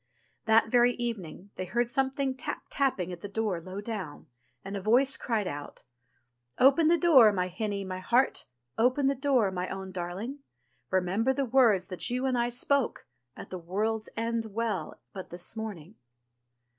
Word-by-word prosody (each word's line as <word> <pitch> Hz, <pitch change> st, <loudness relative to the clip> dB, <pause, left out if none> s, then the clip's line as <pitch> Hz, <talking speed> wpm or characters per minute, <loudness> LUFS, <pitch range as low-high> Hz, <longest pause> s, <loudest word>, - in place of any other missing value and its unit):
That 220 Hz, 0 st, +4 dB
very 245 Hz, 0 st, +5 dB
evening 200 Hz, -6 st, -5 dB
they 185 Hz, -, -3 dB
heard 240 Hz, +6 st, 0 dB
something 265 Hz, +1 st, 0 dB
tap 260 Hz, -, -5 dB
tapping 225 Hz, -11 st, 0 dB
at 170 Hz, -, -9 dB
the -, -, -5 dB
door 200 Hz, -4 st, -2 dB
low 185 Hz, +4 st, -7 dB
down, 205 Hz, -9 st, -6 dB, 0.4 s
and 195 Hz, +1 st, -5 dB
a 200 Hz, -, -3 dB
voice 250 Hz, +7 st, +3 dB
cried 215 Hz, -5 st, -1 dB
out: 145 Hz, -3 st, -7 dB, 0.7 s
"Open 280 Hz, +5 st, +5 dB
the 340 Hz, +1 st, +5 dB
door, 275 Hz, -11 st, +7 dB
my 180 Hz, -2 st, -1 dB
hinny, 200 Hz, +2 st, -3 dB
my 185 Hz, -1 st, -5 dB
heart, 245 Hz, +8 st, +1 dB, 0.3 s
Open 255 Hz, +4 st, +3 dB
the 275 Hz, -, +3 dB
door, 260 Hz, -7 st, +2 dB
my 180 Hz, 0 st, -3 dB
own 190 Hz, 0 st, -6 dB
darling; 185 Hz, +10 st, -5 dB, 0.5 s
Remember 190 Hz, +7 st, +1 dB
the 275 Hz, 0 st, -1 dB
words 230 Hz, -7 st, +4 dB
that 180 Hz, -3 st, -2 dB
you 250 Hz, +2 st, -1 dB
and 260 Hz, -1 st, +1 dB
I 240 Hz, 0 st, +1 dB
spoke. 270 Hz, +2 st, 0 dB, 0.3 s
At -, -, -10 dB
the 185 Hz, -, -4 dB
World's 215 Hz, +6 st, -2 dB
End 230 Hz, 0 st, -1 dB
Well 215 Hz, -6 st, -3 dB
but 190 Hz, -, -8 dB
this 175 Hz, +5 st, -5 dB
morning.' 205 Hz, -6 st, -6 dB
220 Hz, 170 wpm, -29 LUFS, 185-250 Hz, 0.7 s, door